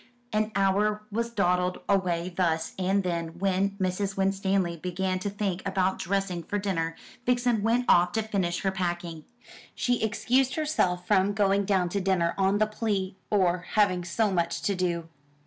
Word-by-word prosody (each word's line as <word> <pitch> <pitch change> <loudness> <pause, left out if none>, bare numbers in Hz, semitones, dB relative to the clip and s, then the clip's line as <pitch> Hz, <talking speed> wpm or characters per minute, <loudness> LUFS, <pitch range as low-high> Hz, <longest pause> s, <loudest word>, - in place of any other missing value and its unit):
An 215 0 +1
hour 205 +2 +2
was 230 +3 -1
dawdled 180 -4 +1
away 180 -3 0
thus, 165 -3 0
and 195 +2 +1
then, 170 -2 -3
when 195 +1 0
Mrs. 190 +1 -1
Winstanley 195 -2 +1
began 185 +2 -2
to 205 - -2
think 195 -2 -2
about 190 -1 0
dressing 190 -2 -1
for 205 +5 -3
dinner, 165 -5 -1 0.3
Vixen 245 -3 +2
went 235 +3 +2
off 175 0 +5
to 220 - 0
finish 190 -5 -1
her 195 - +1
packing. 175 -4 -3 0.5
She 245 -1 0
excused 250 +4 +1
herself 185 - 0
from 200 0 +3
going 200 -1 +2
down 190 -3 +1
to 200 +2 -1
dinner 180 -3 +1
on 195 +1 +2
the 215 - +3
plea 205 -3 -2
or 185 -3 +2
having 185 -4 +3
so 200 +5 0
much 170 -2 -1
to 200 - +1
do. 175 -3 -1
190 Hz, 165 wpm, -27 LUFS, 180-205 Hz, 0.5 s, off